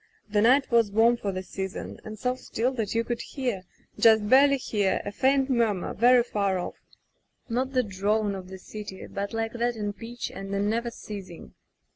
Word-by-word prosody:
The 210 -1 +1
night 260 +5 +4
was 230 -3 +4
warm 225 +3 +5
for 205 -4 -3
the 185 0 -4
season, 190 0 -6
and 215 0 -8
so 250 +4 0
still 250 0 -2
that 225 -5 -3
you 230 - +2
could 235 0 -3
hear 245 -9 -3 0.2
— - - -23
just 220 -2 +5
barely 275 +4 +6
hear 205 -6 0
— - - -20
^ 205 - -4
faint 270 +3 +2
murmur, 230 -8 0
very 245 +2 +5
far 200 -5 0
off; 180 - -6 0.7
not 255 +3 -1
the 255 -1 +3
drone 205 +1 0
of 190 -1 -8
a 190 - -7
city, 205 0 -8
but 200 0 -4
like 225 0 -2
that 240 0 0
in 205 -2 -3
pitch 235 +3 -6
and 195 0 -5
in 200 +1 +1
never 235 +1 -1
ceasing. 195 -6 -9
220 Hz, 200 wpm, -27 LUFS, 200-240 Hz, 0.7 s, barely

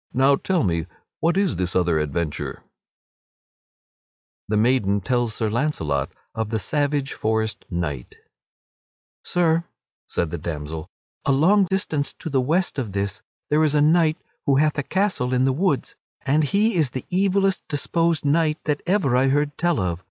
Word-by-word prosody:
Now, 135 +2 +5
tell 185 +5 0
me, 85 -4 0 0.3
what 170 +3 +1
is 195 -2 +1
this 90 0 -2
other 85 -3 +2
adventure?" 75 +1 -2
[Sidenote: - - -20 1.8
The 105 - 0
maiden 105 -3 +2
tells 120 0 0
Sir 110 - -1
Launcelot 105 - -1 0.2
of 110 -1 -3
the 110 - 0
savage 145 +4 -1
forest 110 0 -1
knight] 75 -8 -4 1.1
"Sir," 170 -1 +1 0.4
said 85 -3 -2
the 85 - -4
damsel, 80 0 -5 0.3
"a - - +1
long 185 +9 +4
distance 170 -6 -1
to 160 - -7
the 135 -2 +2
west 165 +4 0
of 110 -7 -4
this 100 +2 -2 0.3
there 155 +1 +4
is 150 -1 +2
a - - +4
knight 160 +1 +4 0.3
who 140 - +4
hath 150 +1 +2
a - - +2
castle 185 -7 0
in 125 +1 +3
the 135 - +2
woods 155 -1 0 0.3
and 150 +3 +3
he 210 +9 +2
is 155 -5 +2
the 130 +1 -6
evilest 195 0 +2
disposed 165 +1 0
knight 155 +1 +2
that 150 -2 -1
ever 180 -10 +2
I 130 +2 +3
heard 145 +2 +1
tell 175 -4 +1
of. 90 -3 -1
140 Hz, 165 wpm, -23 LUFS, 105-160 Hz, 1.8 s, Now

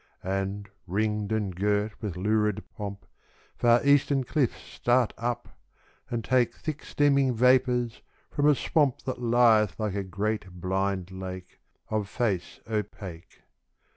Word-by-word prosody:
And, 95 +2 -2 0.2
ringed 105 +2 -1
and 105 -4 -1
girt 105 +2 0
with 100 -6 -4
lurid 105 +1 +1
pomp, 100 -1 -6 0.5
Far 120 +2 +4
eastern 140 -1 +4
cliffs 130 -1 0
start 120 -1 +1
up, 120 +1 -3 0.6
and 115 -1 -2
take 125 -1 +2
Thick 155 -2 -5
steaming 140 -3 +2
vapours 125 -1 +3 0.3
from 145 0 +2
a 150 - +6
swamp 145 -2 +1
That 130 -1 -4
lieth 115 -4 +4
like 105 -3 -1
a 100 - -1
great 100 +1 -3
blind 95 0 -1
lake, 95 -1 -8 0.3
Of 105 -2 -1
face 100 -8 -2
opaque. 100 -5 -6
110 Hz, 130 wpm, -27 LUFS, 100-125 Hz, 0.6 s, a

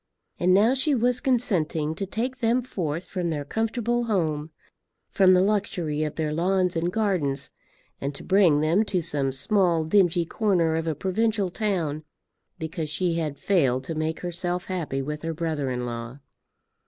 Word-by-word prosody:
And 180 - +3
now 210 +6 +5
she 275 +2 +2
was 245 +1 +1
consenting 165 - +1
to 195 +4 -4
take 250 +6 -3
them 240 +1 +2
forth 170 - -3
from 180 -3 -3
their 145 -3 -3
comfortable 235 - -1
home, 160 -8 -1 0.6
from 185 -2 +5
the 180 - +4
luxury 185 -7 -1
of 155 -1 -2
their 155 -2 -1
lawns 180 +2 +1
and 170 +2 0
gardens, 155 - -1 0.5
and 140 +1 -3
to - - -7
bring 185 -7 +4
them 165 +7 +3
to 190 -3 0
some 140 -4 -1
small 170 +3 +1
dingy 175 0 +3
corner 175 -5 +1
of 165 0 -2
a 160 - 0
provincial 200 +3 0
town, 170 -8 -1 0.5
because 160 -1 -4
she 170 +2 0
had 150 -3 -3
failed 135 -10 +1
to 165 - -4
make 155 +1 -2
herself 175 +1 -3
happy 160 -8 -3
with 150 +2 -5
her 165 0 -3
brother 155 -4 -2
in 125 -1 -2
law. 120 +1 -6
170 Hz, 165 wpm, -25 LUFS, 155-200 Hz, 0.6 s, now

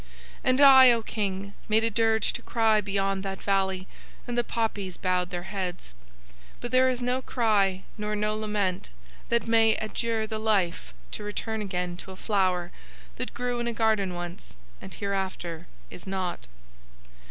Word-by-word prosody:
And 255 +1 +3
I, 265 -2 +9
O 230 -1 -1
King, 200 -2 -3 0.2
made 220 +1 +4
a 230 - +1
dirge 220 0 +2
to - - -4
cry 220 -2 +2
beyond 195 -1 -1
that 195 -1 -5
valley 190 -1 0 0.4
and 240 - -3
the 240 - +2
poppies 205 -6 -2
bowed 180 -1 0
their 175 -1 -4
heads; 185 - -5 0.7
but 240 - -5
there 255 0 +5
is 250 -1 -2
no 250 +1 0
cry 205 -7 +1 0.2
nor 210 0 -2
no 210 +1 0
lament 210 -4 -1 0.4
that 235 0 +1
may 225 -1 +4
adjure 220 0 -2
the 220 0 -4
life 180 - 0 0.2
to - - -5
return 220 +1 -3
again 180 -3 -3
to 180 - -10
a 190 - -8
flower 185 -4 0 0.5
that - - -5
grew 245 0 -2
in 240 - -2
a 235 - -1
garden 215 -5 +1
once 175 - -7 0.3
and - - -9
hereafter 190 -4 -3 0.2
is - - -11
not. 185 - -3
205 Hz, 165 wpm, -27 LUFS, 190-225 Hz, 0.7 s, I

